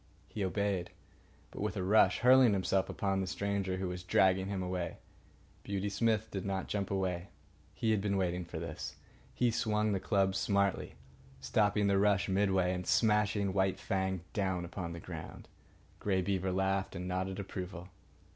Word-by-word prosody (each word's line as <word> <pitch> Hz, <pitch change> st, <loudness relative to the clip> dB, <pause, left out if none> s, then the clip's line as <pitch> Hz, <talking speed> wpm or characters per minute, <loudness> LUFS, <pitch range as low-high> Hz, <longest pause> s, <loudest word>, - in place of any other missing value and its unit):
He 105 Hz, -, -4 dB
obeyed, 95 Hz, -1 st, -1 dB, 0.6 s
but -, -, -7 dB
with 100 Hz, -, -2 dB
a 95 Hz, -, -1 dB
rush, 105 Hz, +4 st, +4 dB
hurling 125 Hz, -2 st, +7 dB
himself 95 Hz, 0 st, +1 dB
upon 95 Hz, -1 st, -1 dB
the 95 Hz, -, -2 dB
stranger 100 Hz, -1 st, -1 dB
who 95 Hz, 0 st, -2 dB
was 90 Hz, 0 st, -5 dB
dragging 95 Hz, +1 st, +3 dB
him 100 Hz, -2 st, -2 dB
away. 90 Hz, -1 st, -3 dB, 0.6 s
Beauty 100 Hz, 0 st, -2 dB
Smith 110 Hz, +1 st, 0 dB
did 95 Hz, -2 st, -3 dB
not 95 Hz, -1 st, -2 dB
jump 100 Hz, -2 st, -2 dB
away. 95 Hz, -2 st, -1 dB, 0.5 s
He 110 Hz, -, +1 dB
had 105 Hz, -2 st, +2 dB
been 100 Hz, -1 st, 0 dB
waiting 90 Hz, -1 st, 0 dB
for 85 Hz, -, -8 dB
this. -, -, -5 dB, 0.4 s
He 125 Hz, -1 st, +2 dB
swung 105 Hz, -1 st, +1 dB
the 100 Hz, -, 0 dB
club 95 Hz, -1 st, +1 dB
smartly, 100 Hz, 0 st, 0 dB, 0.4 s
stopping 105 Hz, -1 st, +2 dB
the 100 Hz, -1 st, +3 dB
rush 100 Hz, -1 st, +3 dB
midway 95 Hz, -2 st, +2 dB
and 90 Hz, 0 st, -4 dB
smashing 105 Hz, -3 st, +2 dB
White 95 Hz, -1 st, +1 dB
Fang 95 Hz, -2 st, -1 dB
down 95 Hz, -4 st, -1 dB
upon 85 Hz, -1 st, -5 dB
the 85 Hz, -, -7 dB
ground. -, -, -8 dB, 0.5 s
Grey 95 Hz, -2 st, +1 dB
Beaver 95 Hz, -1 st, 0 dB
laughed 95 Hz, +1 st, 0 dB
and 90 Hz, 0 st, -4 dB
nodded 95 Hz, +1 st, -2 dB
approval. 95 Hz, -2 st, -6 dB
95 Hz, 165 wpm, -33 LUFS, 95-100 Hz, 0.6 s, hurling